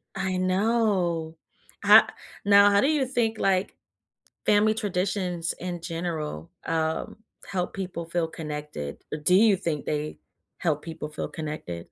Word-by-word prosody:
I 185 -1 -1
know. 185 -4 +1 0.5
Ho - - +10 0.5
Now 200 0 +7
how 200 - +4
do 275 - +3
you 300 -3 +2
think, 235 -4 0
like, 190 -1 +1 0.7
family 215 +1 +4
traditions 185 -4 -1
in 175 -1 -4
general, 165 - -4 0.2
um, 160 +2 -1 0.3
help 180 -2 -2
people 180 -4 -5
feel 170 0 0
connected, 150 - -6
or 150 - -2
do 180 +5 +2
you 205 0 +6
think 165 -5 -3
they 150 0 -3 0.4
help 155 -4 0
people 160 -2 -6
feel 150 - -4
connected? 150 - -5
175 Hz, 135 wpm, -26 LUFS, 160-200 Hz, 0.7 s, Ho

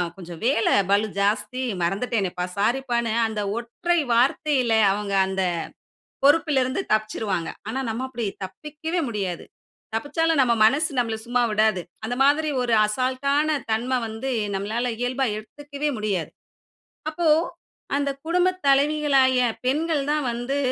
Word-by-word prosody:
கொஞ்சம் 175 -3 -9
வேல 235 -4 +2 0.2
பலு 205 +2 +3
ஜாஸ்தி, 210 +5 0 0.2
மறந்துட்டேனேப்பா, 195 -1 -1
சாரிப்பான்னு 235 +1 0 0.2
அந்த 215 -1 -3 0.2
ஒற்றை 290 +9 -1
வார்த்தைல, 255 0 +2 0.2
அவங்க 200 0 -3
அந்த 190 0 -1 0.8
பொறுப்பிலருந்து 285 0 +3
தப்பிச்சுருவாங்க. 215 -5 -1 0.2
ஆனா 260 +4 -2
நம்ம 230 +4 -3
அப்படி 240 -3 -4 0.2
தப்பிக்கவே 300 - -5
முடியாது. 190 -6 -3 0.5
தப்பிச்சாலும் 295 +6 0
நம்ம 240 -2 +3
மனசு 290 +7 +3
நம்மள 230 -2 +1
சும்மா 245 +1 +1
விடாது. 215 -3 +2 0.2
அந்த 245 +2 -2
மாதிரி 300 +2 +3
ஒரு 240 -2 0
அசால்டான 260 +6 0 0.2
தன்ம 235 +4 0
வந்து 225 +5 -5 0.2
நம்மளால 225 +5 -1
இயல்பா 255 +2 0
எடுத்துக்கவே 290 +6 -5
முடியாது. 200 -6 -2 0.8
அப்போ, 330 +1 -1 0.7
அந்த 280 0 0 0.2
குடும்ப 360 +2 +3 0.2
தலைவிகளாகிய 275 -2 +4 0.3
பெண்கள் 300 +2 +1
தான் 300 -2 0
வந்து 245 +4 -2
245 Hz, 120 wpm, -24 LUFS, 215-285 Hz, 0.8 s, தலைவிகளாகிய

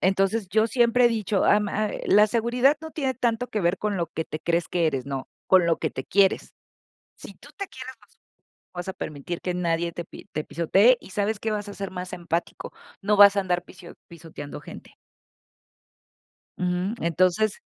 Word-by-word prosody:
entonces, 195 +2 +1
yo 220 +3 +3
siempre 240 +1 +3
he - - +7
dicho, 215 -4 0
am, 210 0 +3
ah, 215 +1 -1 0.2
"La 210 +1 +6
seguridad 240 +5 +2
no 320 - -8
tiene 270 -5 -2
tanto 235 +1 0
que 220 -3 -3
ver 175 +1 +1
con 210 -2 -1
lo 170 -2 -2
que 160 - -4
te 155 - -6
crees 170 +1 0
que 170 -2 +1
eres, 135 -3 -3
no, 135 -1 -5 0.2
con 185 -2 +5
lo 165 -1 +2
que 155 - -1
te 130 - -5
quieres", 195 0 +2 0.6
si - - -12
tú - - -16
te 395 -1 -5
quieres 260 0 -9
vas - - -23
a - - -29 0.6
no 175 - -9
vas 175 - -5
a - - -2
permitir 155 +1 -6
que 180 - -1
nadie 170 -1 -1
te 175 - -5
pi - - -12
te 155 - -3
pisotee, 195 +9 +4
y - - -14
¿sabes 205 +2 -1
qué?, 220 - -3
vas 210 -1 -3
a 205 - -7
ser 195 -1 -5
más 180 0 -6
empático, 170 -1 -4 0.3
no 210 +1 +2
vas 200 0 +8
a - - +4
andar 180 -2 -1
pisio 175 -2 -13 0.2
pisoteando 160 -3 -9
gente. - - -12 1.6
Uju, 180 +3 -1
entonces 185 +5 +1
190 Hz, 205 wpm, -25 LUFS, 170-220 Hz, 1.6 s, vas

